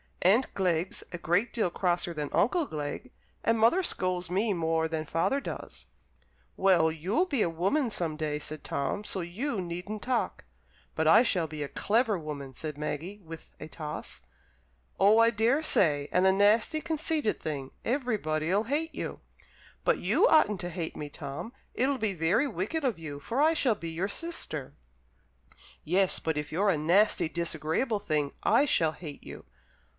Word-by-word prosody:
"Aunt 215 +9 +4
Glegg's 180 -2 0
a 175 - -4
great 175 +8 +1
deal 220 -6 +1
crosser 175 -1 -1
than 150 -2 -3
Uncle 325 - +2
Glegg, 155 - -5 0.3
and 230 0 +2
mother 235 +13 +4
scolds 185 - -1
me 205 +4 +1
more 160 -2 0
than 160 -1 -3
father 165 - +1
does." 275 - -8 0.7
"Well, 175 -4 +4
you'll 185 - 0
be 280 -10 -1
a - - 0
woman 195 - 0
some 165 -6 -2
day," 150 -1 -2
said 155 0 -7
Tom, 140 +9 -2
"so 195 -2 -3
you 205 +8 -3
needn't 180 +5 -5
talk." 250 -2 -1 0.5
"But - - +1
I - - +8
shall 180 -9 +2
be 155 -1 -7
a 145 - -2
clever 220 - +1
woman," 145 -4 -6
said 150 +2 -6
Maggie, 155 +7 -4
with 165 0 -10
a - - -7
toss. 150 - -7 0.8
"Oh, 205 +3 +6
I 230 0 +6
daresay, 220 - +2
and 180 +1 +3
a 190 - +6
nasty, 215 +10 +3
conceited 315 -6 -1
thing. 140 -4 -4
Everybody'll 205 - 0
hate 310 +6 -2
you." - - -5 0.6
"But - - +2
you - - +3
oughtn't 210 - +4
to 175 - -4
hate 170 -2 -5
me, 150 - -6
Tom. 145 +10 -7 0.2
It'll 265 +1 +1
be 215 -3 0
very 175 - +2
wicked 235 - -3
of 250 -8 0
you, 150 -3 -7
for 230 - -3
I 315 +2 +5
shall 255 -8 +2
be 165 -4 -6
your 170 +4 -2
sister." 200 - -3 1.1
"Yes, 185 +3 +2
but 160 -2 -2
if 150 0 -4
you're 200 +6 +2
a 165 - 0
nasty, 175 +3 +3
disagreeable 170 - -1
thing, 150 -7 -1
I 235 +7 +4
shall 160 - +2
hate 150 -3 -9
you." - - -10
180 Hz, 170 wpm, -29 LUFS, 160-230 Hz, 1.1 s, I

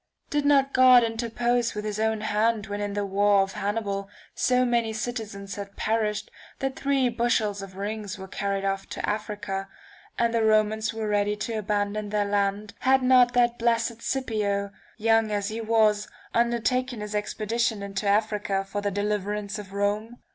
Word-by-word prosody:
Did 295 -1 +1
not 275 -1 +4
God 255 -1 +7
interpose 235 +1 0
with 210 0 -4
his 210 0 -3
own 220 0 0
hand 215 0 +1
when 205 0 -4
in 205 0 -2
the 205 0 -1
war 200 0 +3
of 195 0 -6
Hannibal 200 -1 -2 0.2
so 255 0 +2
many 235 -2 +1
citizens 215 -3 -5
had 200 0 -7
perished 215 -1 -1 0.3
that 270 0 -2
three 275 -2 +1
bushels 230 -4 0
of 195 -1 -9
rings 205 0 -4
were 190 0 -8
carried 195 0 -2
off 195 0 -2
to - - -4
Africa, 205 -2 -3 0.5
and 235 0 +1
the 230 - +2
Romans 215 0 +2
were 225 -1 -4
ready 205 0 +1
to 210 +2 -4
abandon 205 0 -1
their 205 0 +1
land 200 +1 -1
had 265 0 +3
not 250 -1 +5
that 240 -1 +2
blessed 230 0 +2
[1703 230 0 -15
Scipio, 210 -6 -1 0.3
young 225 0 +3
as 205 -1 -1
he 225 +1 -4
was, 215 -2 +2 0.3
undertaken 240 +1 +1
his 210 0 -5
expedition 215 +1 -1
into 200 +1 -3
Africa 205 -1 +1
for 205 +1 -3
the 205 - 0
deliverance 205 0 -2
of 200 -2 -9
Rome 205 +4 -1
215 Hz, 170 wpm, -26 LUFS, 205-230 Hz, 0.5 s, God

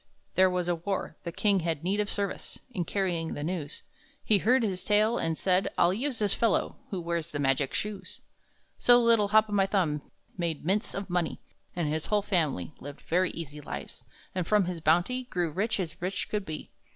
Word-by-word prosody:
There 185 0 +5
was 180 -1 -1
a 175 - +2
war. 185 +4 -3
The 170 - -3
king 200 +2 +2
had 165 -3 -2
need 195 +4 0
of 210 0 0
service 200 -1 -3
In 180 -7 -2
carrying 175 -3 -1
the 145 - -4
news. 160 -3 -4 0.4
He 210 -2 +4
heard 250 +5 +4
his 190 -4 -1
tale, 215 +3 +3
and 165 -1 0
said, 185 0 +2
"I'll 175 +1 +4
use 255 +4 -1
this 205 -2 +1
fellow 230 -2 +1
Who 190 - -3
wears 170 -1 -2
the 150 - -4
magic 135 -1 +1
shoes." 200 -3 -4 0.6
So 245 0 +7
little 230 -3 +4
Hop 215 +1 +5
o' - - -10
my 195 -1 +3
Thumb 165 -8 +1 0.4
made 165 -3 -2
mints 200 +5 +1
of 195 -1 -4
money, 175 -3 -1 0.4
And 170 -3 0
his 155 +1 -2
whole 210 -1 +2
family 150 - 0
Lived 145 +1 -9
very 180 +2 +1
easy 150 -3 -7
lives, - - -7 0.3
and 180 -3 -2
from 210 -3 +4
his 175 -2 -4
bounty 175 +12 +2
Grew 175 -8 -1
rich 210 +6 0
as 170 -4 -4
rich 185 +2 -2
could 205 -3 -2
be. 155 -1 -6
185 Hz, 200 wpm, -29 LUFS, 165-205 Hz, 0.6 s, So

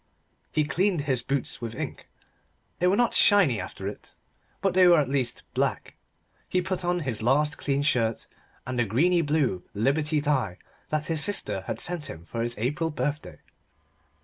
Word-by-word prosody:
He 155 - +2
cleaned 175 +3 +1
his 135 -4 0
boots 140 -3 -2
with 115 -1 -5
ink; - - -6 0.7
they 180 - +3
were 185 - +4
not 240 +2 +2
shiny 185 - +5
after 95 +2 -6
it, 100 - -8 0.4
but 195 - +1
they 185 0 +6
were 170 -2 +7
at 145 - +1
least 130 -3 -1
black. - - -1 0.5
He 185 - +2
put 185 0 -2
on 175 0 0
his 130 -8 -3
last 145 +6 +2
clean 140 0 0
shirt 115 -6 +1 0.4
and 125 0 -3
the - - +4
greeny 165 - +2
blue 145 - +1
Liberty 150 +7 +1
tie 130 - 0 0.3
that 155 0 -1
his 160 -2 -1
sister 105 - -1
had - - -3
sent 175 -5 -3
him 80 +1 -9
for 115 +5 -4
his 120 +1 -1
April 145 +9 -1
birthday. 150 -1 -3
145 Hz, 175 wpm, -26 LUFS, 120-170 Hz, 0.7 s, were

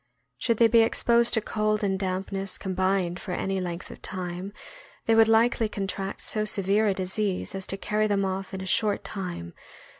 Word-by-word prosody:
Should 230 - +1
they 230 - +6
be 230 0 +5
exposed 235 +1 +4
to 220 - +2
cold 215 0 0
and 195 -1 0
dampness 195 +1 -3
combined 185 -2 0
for 180 - -5
any 195 +1 -1
length 175 -1 -5
of - - -12
time, 185 +1 -5 0.5
they 225 - +3
would 225 0 +6
likely 225 0 +3
contract 195 -1 -4
so 215 - 0
severe 205 +1 +1
a 200 - +3
disease 190 +1 -2
as 190 -1 -5
to 195 - -3
carry 215 +2 0
them 200 -1 +1
off 190 0 -3
in 190 -1 -5
a - - -5
short 205 +2 +1
time. 175 - -5
195 Hz, 185 wpm, -26 LUFS, 185-215 Hz, 0.5 s, they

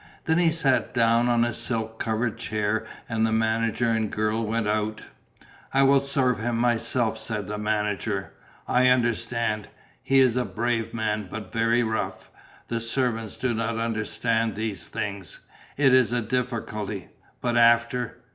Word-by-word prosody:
Then 160 +1 +2
he 170 -2 +4
sat 145 -6 +1
down 115 +1 +3
on 120 -1 +3
a 120 - -2
silk 115 -1 -3
covered 110 0 -1
chair 105 0 -1 0.2
and 115 -1 0
the 110 - +2
manager 110 +1 +1
and 110 -1 +1
the - - -6
girl 110 +1 0
went 110 0 -1
out. 105 0 -1 0.7
"I 135 - +5
will 135 0 +5
serve 135 -4 +1
him 115 +1 -1
myself," 120 -1 +1
said 110 -2 -3
the 105 0 -4
manager. 105 -1 -1 0.3
"I 125 +1 +4
understand; 115 -3 +1 0.3
he 135 0 +3
is 125 -2 +4
a 125 - +2
brave 115 -1 -2
man 110 -3 -2
but 105 -3 -7
very 115 +1 +2
rough; 95 -4 -3 0.4
the 115 - -2
servants 115 -2 -1
do 130 -2 0
not 115 0 -2
understand 115 0 -1
these 105 -5 -4
things. 100 -5 -5 0.4
It 135 -2 +4
is 130 -3 +5
a 120 0 +1
difficulty, 110 -4 -3 0.3
but 120 -1 -1
after 120 0 +3
115 Hz, 155 wpm, -25 LUFS, 110-120 Hz, 0.7 s, I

